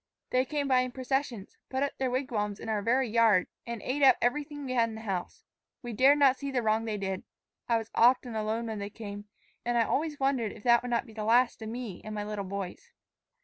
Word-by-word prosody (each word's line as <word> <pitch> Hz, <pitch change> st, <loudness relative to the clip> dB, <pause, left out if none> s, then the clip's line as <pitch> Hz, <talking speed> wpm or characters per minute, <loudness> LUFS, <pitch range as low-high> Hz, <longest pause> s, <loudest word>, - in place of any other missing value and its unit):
They 255 Hz, +1 st, +3 dB
came 290 Hz, 0 st, -2 dB
by 260 Hz, -2 st, +4 dB
in 255 Hz, -1 st, -1 dB
processions, 260 Hz, -5 st, -3 dB
put 265 Hz, +1 st, 0 dB
up 280 Hz, -, -2 dB
their 260 Hz, -1 st, +1 dB
wigwams 225 Hz, -6 st, -2 dB
in -, -, -6 dB
our 215 Hz, -2 st, 0 dB
very 250 Hz, +4 st, +2 dB
yard, 220 Hz, -4 st, +4 dB, 0.2 s
and 235 Hz, -2 st, -5 dB
ate 275 Hz, +3 st, -2 dB
up 265 Hz, -3 st, +7 dB
everything 290 Hz, +3 st, -1 dB
we 255 Hz, -, -4 dB
had 230 Hz, -2 st, +3 dB
in 220 Hz, -, -7 dB
the 220 Hz, -, -8 dB
house. 190 Hz, -5 st, -4 dB, 0.4 s
We 240 Hz, -1 st, -5 dB
dared 270 Hz, +6 st, +5 dB
not 275 Hz, -2 st, +5 dB
see 280 Hz, -, -4 dB
the 255 Hz, -3 st, -1 dB
wrong 220 Hz, +1 st, +1 dB
they 215 Hz, -2 st, -2 dB
did. 190 Hz, -1 st, -3 dB, 0.5 s
I 230 Hz, -, +4 dB
was 225 Hz, 0 st, -6 dB
often 245 Hz, 0 st, +4 dB
alone 220 Hz, +2 st, -1 dB
when 220 Hz, -2 st, -4 dB
they 200 Hz, 0 st, -4 dB
came, 205 Hz, -1 st, -8 dB, 0.4 s
and 240 Hz, 0 st, 0 dB
I 230 Hz, -, +5 dB
always 300 Hz, +5 st, -1 dB
wondered 265 Hz, -6 st, 0 dB
if -, -, -14 dB
that 235 Hz, -1 st, +5 dB
would 245 Hz, -, -5 dB
not 235 Hz, -1 st, 0 dB
be 220 Hz, -, -14 dB
the 215 Hz, -1 st, -5 dB
last 240 Hz, +2 st, +3 dB
of 220 Hz, -, -5 dB
me 230 Hz, -5 st, -6 dB
and 215 Hz, 0 st, -6 dB
my 210 Hz, -, -2 dB
little 205 Hz, -1 st, -4 dB
boys. 195 Hz, -, -6 dB
235 Hz, 240 wpm, -29 LUFS, 215-260 Hz, 0.5 s, up